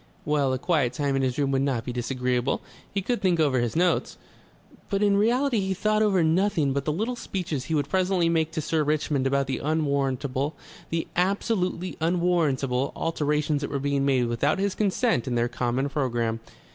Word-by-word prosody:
Well, 145 -3 +1
a 130 - 0
quiet 140 -4 +1
time 140 +1 -1
in 135 - +1
his 130 -2 -1
room 140 -2 +1
would 135 -1 +1
not 130 -5 -1
be 125 - -4
disagreeable. 125 +1 -1 0.3
He 200 -1 -2
could 240 +4 -1
think 180 -3 +2
over 140 -5 +3
his 120 +2 -1
notes.... 175 +2 +1 0.7
But 200 +1 0
in 200 -1 +4
reality 240 +4 +2
he 190 -1 -1
thought 215 +2 +1
over 195 -5 +3
nothing 160 -4 +2
but 140 0 -2
the 150 - +1
little 220 +10 -2
speeches 175 - -4
he 160 - -1
would 145 -2 0
presently 185 -2 +1
make 160 -1 +1
to 160 - -1
Sir 155 +1 0
Richmond 150 -2 0
about 140 0 +1
the 135 - -3
unwarrantable, 140 -2 -1 0.3
the 165 0 -1
absolutely 185 -1 0
unwarrantable, 160 -7 +1
alterations 150 -2 0
that 145 - -3
were 140 - -2
being 140 0 0
made 130 -3 +2
without 120 - +1
his 195 0 0
consent 210 - +1
in 125 - -1
their 120 0 +2
common 125 +2 -1
programme.... 120 -5 -1
150 Hz, 190 wpm, -26 LUFS, 135-180 Hz, 0.7 s, in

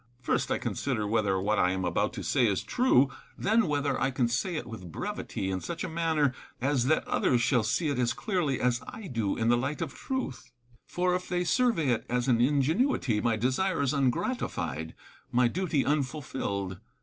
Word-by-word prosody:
First, 125 - 0
I - - +1
consider 120 -6 -2
whether 105 -3 +1
what 105 +3 +1
I 90 - +4
am 95 -1 -2
about 85 - 0
to - - -5
say 125 -3 +3
is 100 -3 0
true; 140 - +3 0.3
then, 220 0 +2
whether 145 -3 0
I 135 - +3
can 130 -2 +1
say 135 +10 -1
it 155 - -3
with 105 -7 -9
brevity, 95 +4 -4
in 95 -1 -2
such 170 0 -4
a - - -2
manner 160 -5 +1 0.3
as 130 -1 +1
that 155 - +2
others 120 -2 +2
shall 120 0 +3
see 115 +10 0
it 140 - -1
as 120 -1 +2
clearly 180 - -1
as 125 -1 +1
I 220 -4 -8
do 115 - -1
in 115 0 +1
the 120 - +5
light 130 +5 -2
of 160 -5 -3
truth; 260 - -4 0.4
for, 180 0 0
if 180 0 -2
they 180 -1 0
survey 190 - +2
it 120 -3 0
as 125 +1 0
an 120 -3 +3
ingenuity, 140 - +2
my 115 0 +2
desire 130 - 0
is 140 0 +1
ungratified, 120 - -1 0.4
my 125 0 +4
duty 160 0 0
unfulfilled. 130 - -2
130 Hz, 195 wpm, -29 LUFS, 115-165 Hz, 0.4 s, the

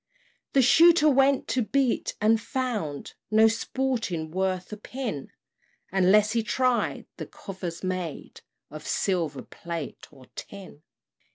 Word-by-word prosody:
The 270 - +5
Shooter 330 +4 +6
went 275 -1 +3
to 255 - +1
beat, 260 +2 0
and 220 +1 +3
found 225 - -3 0.2
No 220 +1 +6
sporting 225 -8 -2
worth 185 +1 -2
a - - -6
pin, 225 - -5 0.6
Unless 195 +3 +4
he 230 0 +1
tried 250 +2 0
the - - -6
covers 180 -4 -7
made 185 -4 -4 0.3
Of 155 0 -9
silver, 165 -8 -1
plate, 170 -4 -7
or 135 -3 -17
tin. 195 -7 -10
210 Hz, 120 wpm, -26 LUFS, 175-255 Hz, 0.6 s, Shooter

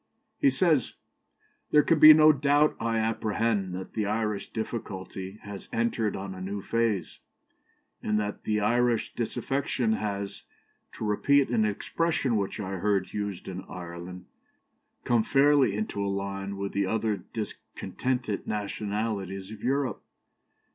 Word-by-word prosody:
He - - +5
says 150 -1 +2 0.7
"There 150 -1 +5
can 165 -2 +3
be 155 +1 +11
no 155 0 +8
doubt, 145 +1 +3
I 115 0 0
apprehend, 110 -3 0
that 95 0 -7
the 105 -2 -1
Irish 105 -1 -1
difficulty 95 -3 -5
has 100 -1 -8
entered 115 -2 0
on 95 0 -5
a 95 - -9
new 100 +2 -3
phase, 115 -3 -1 0.8
and 105 0 +1
that 105 -1 -3
Irish 115 +2 +1
disaffection 120 -1 -1
has, 100 -2 -3 0.5
to - - -5
repeat 135 +6 +3
an 115 -3 +2
expression 145 +5 0
which 100 +1 -2
I 95 -2 -3
heard 100 -1 0
used 100 -3 -4
in 95 0 -5
Ireland, 90 +1 -8 0.8
come 120 -2 +3
fairly 140 -2 +4
into 105 -1 -2
a 100 - -1
line 100 0 -3
with 100 0 -3
the 100 -1 0
other 110 0 0
discontented 115 +1 -4
nationalities 105 -2 -3
of 110 -2 -9
Europe. 135 -3 0
105 Hz, 135 wpm, -28 LUFS, 100-120 Hz, 0.8 s, be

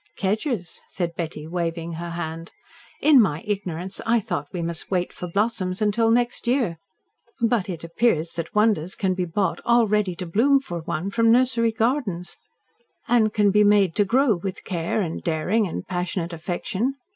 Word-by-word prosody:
"Kedgers!" 205 - -2
said 175 -3 -3
Betty, 160 -3 -5
waving 170 0 -3
her 170 +1 -5
hand. 165 -1 -5 0.5
"In 290 -4 +7
my 165 -6 0
ignorance 190 -3 -3
I 230 +1 +3
thought 145 -8 -3
we 175 -2 -3
must 165 -1 -5
wait 180 -2 -1
for 180 - -6
blossoms 190 -1 -1
until 220 +2 +2
next 240 +1 +1
year; 235 - +1 0.6
but 230 -4 +1
it 170 -3 -5
appears 170 -2 +1
that 165 +3 -5
wonders 210 -5 +2
can 190 -2 0
be 180 -1 -1
brought 185 +3 -1
all 235 -1 +4
ready 205 -3 +1
to 180 - -5
bloom 240 +11 +3
for 175 -10 -6
one 170 +3 -3
from 230 +1 +3
nursery 235 -2 +3
gardens, 220 -6 -1 0.7
and 225 -3 +3
can 210 -1 +3
be 210 +1 +5
made 205 -4 +4
to 205 - +5
grow 245 +4 +3
with 185 0 -5
care 175 +4 -1
and 165 -2 -4
daring 185 +6 +1
and 90 - -5
passionate 180 -1 -3
affection. 185 +9 -2
190 Hz, 170 wpm, -24 LUFS, 170-225 Hz, 0.7 s, In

